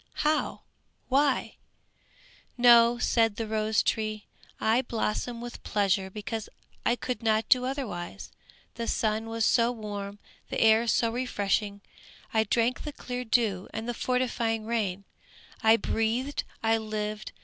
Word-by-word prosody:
How? 305 Hz, +1 st, +1 dB, 0.5 s
Why?" 275 Hz, 0 st, +2 dB, 1.0 s
"No," 240 Hz, -1 st, +7 dB
said 225 Hz, -3 st, +2 dB
the 225 Hz, -, -3 dB
rose 215 Hz, 0 st, +1 dB
tree, 215 Hz, -1 st, -1 dB, 0.3 s
"I 225 Hz, +3 st, +3 dB
blossom 235 Hz, 0 st, -2 dB
with 240 Hz, 0 st, -8 dB
pleasure 195 Hz, -2 st, +1 dB
because 215 Hz, +2 st, -5 dB, 0.3 s
I 240 Hz, -, +2 dB
could 245 Hz, -1 st, -4 dB
not 220 Hz, -1 st, +1 dB
do 250 Hz, -1 st, +5 dB
otherwise. 210 Hz, -, -5 dB, 0.4 s
The 230 Hz, 0 st, -4 dB
sun 220 Hz, 0 st, 0 dB
was 225 Hz, 0 st, 0 dB
so 235 Hz, 0 st, +3 dB
warm, 205 Hz, -3 st, -6 dB, 0.3 s
the -, -, -2 dB
air 225 Hz, +1 st, +5 dB
so 230 Hz, +1 st, +2 dB
refreshing, 205 Hz, -4 st, -1 dB, 0.5 s
I 220 Hz, 0 st, +3 dB
drank 235 Hz, +3 st, +1 dB
the 295 Hz, -, -6 dB
clear 250 Hz, -2 st, -5 dB
dew 220 Hz, -5 st, +1 dB
and 220 Hz, +1 st, -4 dB
the 240 Hz, -, -1 dB
fortifying 235 Hz, -3 st, -1 dB
rain; 205 Hz, -5 st, -1 dB, 0.6 s
I 220 Hz, +1 st, +6 dB
breathed, 230 Hz, +6 st, -1 dB, 0.2 s
I 225 Hz, 0 st, +3 dB
lived! 215 Hz, -1 st, -4 dB
225 Hz, 135 wpm, -28 LUFS, 215-240 Hz, 1.0 s, No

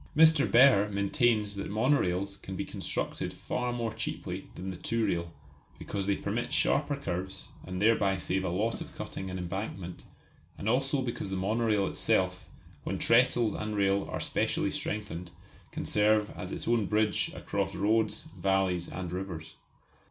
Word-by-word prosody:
Mr. 160 Hz, -2 st, +6 dB
Behr 120 Hz, -5 st, +7 dB
maintains 105 Hz, 0 st, +2 dB
that 100 Hz, -, -4 dB
monorails 100 Hz, -4 st, +1 dB
can 95 Hz, -, -6 dB
be -, -, -3 dB
constructed -, -, -3 dB
far 125 Hz, -1 st, -3 dB
more 115 Hz, -2 st, -2 dB
cheaply 110 Hz, 0 st, -4 dB
than 95 Hz, +2 st, -5 dB
the -, -, -6 dB
two 115 Hz, +5 st, -1 dB
rail, 85 Hz, -1 st, -1 dB, 0.5 s
because 100 Hz, -1 st, -4 dB
they 100 Hz, -, +3 dB
permit -, -, -2 dB
sharper -, -, +2 dB
curves, 95 Hz, +2 st, -4 dB, 0.2 s
and 90 Hz, 0 st, -4 dB
thereby 100 Hz, -2 st, +3 dB
save 90 Hz, +3 st, -1 dB
a 90 Hz, -, -1 dB
lot 105 Hz, +6 st, -1 dB
of -, -, -8 dB
cutting 95 Hz, -, -5 dB
and 95 Hz, -, -4 dB
embankment; 90 Hz, 0 st, -5 dB, 0.5 s
and 100 Hz, -, -5 dB
also 135 Hz, +3 st, +2 dB
because 120 Hz, -5 st, -3 dB
the 95 Hz, -, -2 dB
monorail 105 Hz, +1 st, +1 dB
itself, -, -, +1 dB, 0.4 s
when -, -, -2 dB
trestles 115 Hz, -2 st, +4 dB
and 105 Hz, 0 st, -3 dB
rail 100 Hz, -1 st, +2 dB
are -, -, -3 dB
specially -, -, 0 dB
strengthened, 90 Hz, -5 st, -3 dB, 0.4 s
can -, -, -4 dB
serve 105 Hz, 0 st, +3 dB
as 90 Hz, +1 st, -7 dB
its -, -, -5 dB
own 115 Hz, -4 st, +2 dB
bridge 105 Hz, 0 st, +1 dB
across 100 Hz, -1 st, -2 dB
roads, 110 Hz, +7 st, +1 dB
valleys 95 Hz, -3 st, +1 dB
and 90 Hz, -1 st, -5 dB
rivers. 90 Hz, -3 st, -5 dB
100 Hz, 160 wpm, -30 LUFS, 95-115 Hz, 0.5 s, Behr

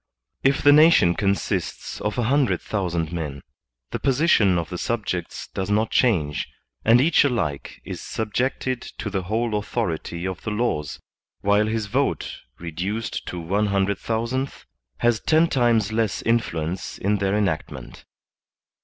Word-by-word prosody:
If 135 Hz, 0 st, +2 dB
the 145 Hz, -, +8 dB
nation 150 Hz, -, +6 dB
consists 100 Hz, -1 st, -2 dB
of 105 Hz, -, -2 dB
a 120 Hz, -, +1 dB
hundred 125 Hz, -, +2 dB
thousand 85 Hz, -5 st, -2 dB
men, 75 Hz, -5 st, -4 dB, 0.5 s
the -, -, -3 dB
position 130 Hz, -, +3 dB
of 85 Hz, -1 st, -3 dB
the 90 Hz, -, -4 dB
subjects 100 Hz, -7 st, -3 dB
does 95 Hz, 0 st, -3 dB
not 105 Hz, +2 st, +1 dB
change, 80 Hz, -, +1 dB, 0.4 s
and 115 Hz, +2 st, +6 dB
each 155 Hz, +5 st, +4 dB
alike 80 Hz, -, -2 dB
is -, -, -6 dB
subjected 125 Hz, +3 st, -2 dB
to 105 Hz, -, -6 dB
the 95 Hz, -1 st, -1 dB
whole 110 Hz, +5 st, -1 dB
authority 85 Hz, -3 st, -3 dB
of 95 Hz, -1 st, -4 dB
the -, -, -4 dB
laws, 105 Hz, -, -1 dB, 0.4 s
while 105 Hz, +2 st, +3 dB
his 110 Hz, -1 st, -1 dB
vote 130 Hz, +7 st, -1 dB, 0.2 s
reduced 90 Hz, +7 st, -4 dB
to 90 Hz, -, -4 dB
one 100 Hz, +6 st, 0 dB
hundred 100 Hz, 0 st, +1 dB
thousandth, 115 Hz, +4 st, -2 dB, 0.3 s
has 120 Hz, -, +2 dB
ten 160 Hz, +1 st, +3 dB
times 120 Hz, -7 st, +2 dB
less 110 Hz, -3 st, 0 dB
influence 90 Hz, -7 st, -1 dB
in 105 Hz, +2 st, +1 dB
their 100 Hz, +1 st, +1 dB
enactment. 100 Hz, -7 st, -3 dB
105 Hz, 145 wpm, -23 LUFS, 90-120 Hz, 0.5 s, the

